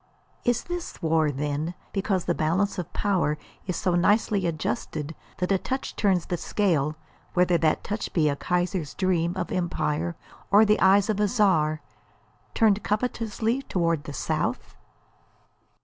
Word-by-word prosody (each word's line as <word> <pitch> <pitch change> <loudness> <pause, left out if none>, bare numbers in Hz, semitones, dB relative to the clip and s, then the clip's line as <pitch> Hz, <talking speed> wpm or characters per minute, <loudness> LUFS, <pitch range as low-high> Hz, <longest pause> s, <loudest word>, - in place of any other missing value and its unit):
Is 245 -1 +1
this 350 -1 -5
war, 160 -1 +3
then, 145 +4 -2 0.2
because 195 -2 0
the 175 - +1
balance 180 +6 0
of 175 - -5
power 180 -7 +1 0.3
is 180 - -1
so 180 - 0
nicely 200 +1 +2
adjusted 155 0 -3 0.2
that 180 +1 -1
a 195 - +3
touch 265 +6 -4
turns 190 -5 +2
the 175 - -2
scale, 160 -7 0 0.4
whether 180 -1 +4
that 155 -1 +1
touch 210 +1 -3
be 160 -3 +2
a 145 - +1
Kaiser's 175 0 -1
dream 175 -2 +1
of - - -3
empire 170 -2 -1 0.3
or 205 +3 +6
the 210 0 +3
eyes 195 +1 +5
of 215 -2 0
a 210 - +3
Czar 165 -9 +2 0.7
turned 215 -3 +4
covetously 225 +2 -1
toward 165 - 0
the - - -6
South? - - -2
180 Hz, 150 wpm, -26 LUFS, 160-205 Hz, 0.7 s, or